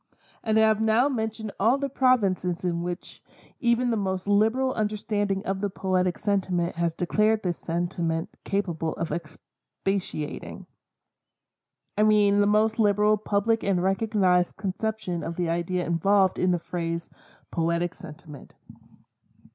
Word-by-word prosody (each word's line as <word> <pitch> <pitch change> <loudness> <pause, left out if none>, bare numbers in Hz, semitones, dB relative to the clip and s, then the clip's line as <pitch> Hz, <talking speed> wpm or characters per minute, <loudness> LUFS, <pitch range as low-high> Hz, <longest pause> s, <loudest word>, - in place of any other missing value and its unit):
And 220 -1 +1
I - - +6
have 220 0 +3
now 220 +4 +3
mentioned 220 -4 -3
all 230 +7 +4
the 280 0 -2
provinces 200 -10 +1
in 170 -2 -1
which 175 +1 -6 0.4
even 240 -1 +2
the 225 - +1
most 190 -1 -2
liberal 225 +6 +2
understanding 205 -2 -1
of 190 0 -2
the 205 - 0
poetic 185 -2 0
sentiment 185 -4 0
has 170 -1 -1
declared 215 +4 +1
this 175 -3 -2
sentiment 170 -1 -2
capable 170 -5 -2
of 165 -2 -4
expatiating. 165 +1 -5 1.3
I 210 - +1
mean 210 -1 +4
the 205 - +3
most 215 +2 +2
liberal 210 0 +4
public 215 +2 0
or 195 -1 +1
recognized 185 -1 +1
conception 195 -2 -3
of 170 - -5
the 175 -1 -1
idea 175 +2 -1
involved 190 +3 +2
in 185 - +2
the 180 - +2
phrase 170 -1 -4 0.4
"poetic 170 +1 0
sentiment." 150 -3 -12
195 Hz, 135 wpm, -26 LUFS, 175-215 Hz, 1.3 s, I